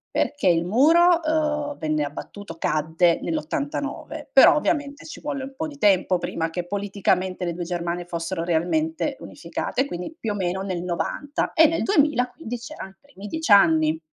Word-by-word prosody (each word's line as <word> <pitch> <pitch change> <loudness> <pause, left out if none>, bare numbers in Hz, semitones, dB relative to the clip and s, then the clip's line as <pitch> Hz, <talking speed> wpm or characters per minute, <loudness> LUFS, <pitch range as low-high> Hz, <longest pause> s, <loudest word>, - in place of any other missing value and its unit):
Perché 290 -9 0
il 170 -1 +3
muro, 330 - +4
ehm, 300 -2 -1
venne 155 -1 -1
abbattuto 165 +4 -8
cadde 160 +3 +1
nell'89. 290 -2 -4
Però - - +8
ovviamente, 285 -2 -1
ci - - -9
volle 280 -2 -4
un 270 0 -8
po' 315 +3 -3
di 290 -2 -11
tempo 190 -5 +3
prima 165 -1 -3
che 175 +1 -4
politicamente 190 -2 -1
le 170 - -2
2 175 +1 -5
Germanie 175 0 -3
fossero 170 0 -4
realmente 245 - -1
unificate, - - -4
e - - +1
quindi 180 - -6
più 220 - -2
o - - -3
meno 190 -1 -2
nel 185 -3 -3
'90. 230 - -2
E 320 0 +6
nel 330 +1 -1
2000 290 -8 +2
quindi 245 -6 -6
c'erano 245 -3 -9
i 195 - -28
primi 280 -8 -12
10 320 +1 -4
anni. 160 -5 +5
205 Hz, 175 wpm, -23 LUFS, 175-290 Hz, -, Però